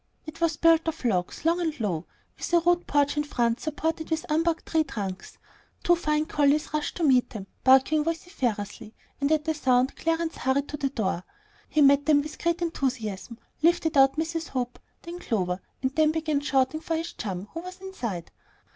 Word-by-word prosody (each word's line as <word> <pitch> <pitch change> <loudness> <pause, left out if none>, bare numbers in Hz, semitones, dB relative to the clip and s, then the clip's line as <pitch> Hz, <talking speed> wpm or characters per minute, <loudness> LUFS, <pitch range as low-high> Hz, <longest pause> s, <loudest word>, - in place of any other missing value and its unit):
It 310 +1 -10
was 330 -2 +1
built 330 0 +4
of 320 -4 -3
logs, 185 - -1
long 340 +2 +2
and 320 -4 -2
low, 180 -7 -2 0.3
with - - -6
a 345 - +7
rude 350 +1 +1
porch 285 0 +2
in 295 - +2
front 240 -5 0
supported 320 +1 -3
on 320 - +3
unbarked 330 +2 +1
tree 320 -1 +2
trunks. 195 -9 -6 0.5
Two 350 - +5
fine 305 -2 0
collies 295 0 +1
rushed 300 -1 -2
to 345 - -2
meet 260 -5 +4
them, 210 -5 -7 0.2
barking 265 +4 +5
vociferously; 255 - -3 0.2
and 280 +1 +1
at 305 -1 +2
the 320 - +1
sound 260 -3 +2
Clarence 330 0 -1
hurried 270 +2 0
to 295 - -4
the 275 -2 -1
door. 190 -8 -2 0.5
He 305 - +2
met 280 +1 +5
them 290 -2 +5
with 305 - -9
great 340 +1 0
enthusiasm, 240 - -3 0.2
lifted 330 -1 +2
out 270 -1 +6
Mrs. 330 +1 -2
Hope, 250 -2 -3 0.2
then 345 0 -7
Clover, 185 - -1 0.2
and 260 +1 0
then 310 -1 +4
began 310 -2 0
shouting 275 +1 +1
for 325 +1 -2
his 330 +1 -4
chum, 195 -2 -5
who 330 - -4
was 365 +2 -9
inside. 240 - -5
300 Hz, 190 wpm, -26 LUFS, 255-325 Hz, 0.5 s, a